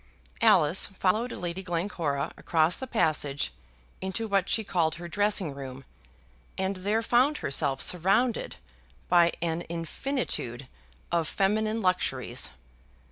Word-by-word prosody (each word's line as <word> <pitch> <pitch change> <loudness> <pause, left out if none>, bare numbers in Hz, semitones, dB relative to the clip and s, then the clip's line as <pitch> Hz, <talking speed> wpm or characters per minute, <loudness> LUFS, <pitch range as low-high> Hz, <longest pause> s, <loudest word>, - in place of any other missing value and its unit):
Alice 150 +5 +5
followed 210 +5 0
Lady 175 +1 -4
Glencora 170 -6 -2
across 160 +1 +2
the 260 - -5
passage 150 - 0 0.5
into 190 +4 -3
what 195 -2 +1
she 220 - +2
called 165 -6 0
her 175 0 -8
dressing 200 -3 0
room, 135 -1 -8 0.7
and 190 0 -1
there 210 +5 0
found 255 +6 +3
herself 140 -1 0
surrounded 195 +8 +2 0.5
by 170 -1 +5
an 165 0 -1
infinitude 165 - -3 0.4
of 170 -2 +1
feminine 215 +2 0
luxuries. 185 0 0
180 Hz, 115 wpm, -28 LUFS, 160-210 Hz, 0.7 s, Alice